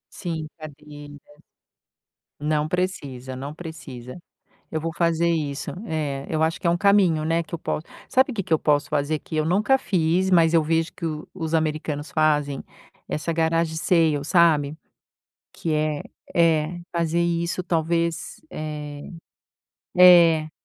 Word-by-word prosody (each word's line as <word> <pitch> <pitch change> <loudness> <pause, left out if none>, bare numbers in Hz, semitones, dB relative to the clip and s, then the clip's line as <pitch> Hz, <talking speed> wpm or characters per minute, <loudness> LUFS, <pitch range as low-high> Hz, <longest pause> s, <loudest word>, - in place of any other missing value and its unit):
Sim, 165 -4 -4
cadeira. 145 -1 -11 1.3
Não 150 0 0
precisa, 140 -8 -3
não 140 +3 -6
precisa. 150 -6 -9 0.5
Eu 160 - -2
vou 165 +1 -3
fazer 170 0 +2
isso. 150 -4 -2 0.2
É, 145 -4 -3
eu 160 -1 0
acho 160 +1 0
que - - -3
é - - +5
um 170 - +2
caminho, 190 -5 +3
né, 165 +1 +1
que 170 - -9
eu - - -3
posso 155 - -3 0.2
sabe 260 +2 +3
que 200 - -2
que 170 - -6
eu 160 - +5
posso 145 -1 +1
fazer, 150 +1 0
que 155 - -10
eu 155 0 +1
nunca 210 +10 +3
fiz, 185 -4 +1
mas 165 -3 +5
eu 165 -1 +4
vejo 165 +1 0
que 170 - -5
o 155 -1 -4
os 165 -3 -4
americanos 155 -2 -1
fazem? 150 -3 +1 0.5
Essa 150 +2 -2
garage 165 0 0
sale, 160 -5 +2
sabe. 155 -2 +3 0.8
Que 165 - -3
é 155 -1 0 0.3
é, 165 0 +2
fazer 170 0 0
isso 170 +1 -1
talvez, 170 0 -1
eh 150 -1 -6 0.9
É. 170 -3 +7
160 Hz, 150 wpm, -24 LUFS, 150-170 Hz, 1.3 s, É